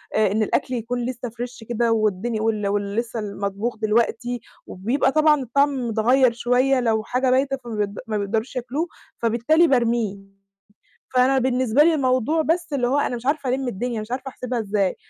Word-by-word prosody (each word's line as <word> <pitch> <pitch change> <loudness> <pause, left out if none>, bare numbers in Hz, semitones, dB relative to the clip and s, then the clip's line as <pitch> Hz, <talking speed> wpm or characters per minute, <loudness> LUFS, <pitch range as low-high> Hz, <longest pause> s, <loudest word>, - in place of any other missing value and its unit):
إن 215 0 +2
الأكل 255 +4 -1
يكون 240 +1 -2
لسّه 245 -1 -4
fresh 240 0 -8
كده 235 0 +1
والدنيا 215 0 0
وال 215 -2 0
واللي 200 0 -1
لِسّه 235 -1 -4
المطبوخ 200 +2 -3
دلوقتي، 230 +2 0 0.3
وبيبقى 235 +9 0
طبعًا 305 -1 +4
الطعم 265 0 +1
متغيّر 240 +3 +3
شوية 250 +3 +2
لو 220 -3 +1
حاجة 255 +2 0
بايتة، 270 +1 +2
فما 230 -5 -2
بي 200 - -11
ما 215 -1 -1
بيقدرش 220 +6 -2
ياكلوه، 260 +7 -2 0.3
فبالتالي 240 +9 +3
بارميه. 235 -6 +1 1.0
فأنا 260 +2 +4
بالنسبة 255 +1 +3
لي 335 +1 +4
الموضوع 260 +2 +1
بس 330 0 -1
اللي 245 -3 +1
هو 275 - +1
أنا 250 - -1
مش 235 - -8
عارفة 285 -1 0
ألم 260 +1 -1
الدنيا، 235 +1 -3
مش 215 - -9
عارفة 265 +2 -3
أحسبها 250 -1 -4
إزاي، 200 -3 0
240 Hz, 170 wpm, -22 LUFS, 220-260 Hz, 1.0 s, طبعًا